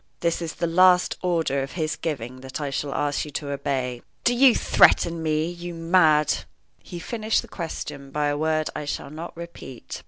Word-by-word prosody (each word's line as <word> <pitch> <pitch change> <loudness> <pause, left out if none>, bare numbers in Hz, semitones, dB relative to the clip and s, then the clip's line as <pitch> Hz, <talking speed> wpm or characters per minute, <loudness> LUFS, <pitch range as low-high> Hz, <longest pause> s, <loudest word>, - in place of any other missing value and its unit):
"This 170 0 0
is 165 -2 -4
the - - -1
last 180 +2 +4
order 165 -6 0
of 135 - -5
his 155 -3 -1
giving 130 -6 -5
that 130 +2 -6
I 145 -2 -3
shall 140 +1 -2
ask 145 -1 0
you 150 - -7
to 140 0 -4
obey." 130 -3 -2 0.2
"Do 245 - +3
you 250 0 +6
threaten 170 -1 +4
me, 155 0 0
you 175 0 -6
mad 165 -3 +3
" - - -44
He 175 - -9
finished 220 +5 -1
the - - -12
question 150 -5 -6
by 150 +2 -1
a 145 - 0
word 155 +1 0
I 150 - -4
shall 145 - -4
not 165 +2 -8
repeat. 170 -7 -8
155 Hz, 195 wpm, -24 LUFS, 145-170 Hz, 0.2 s, you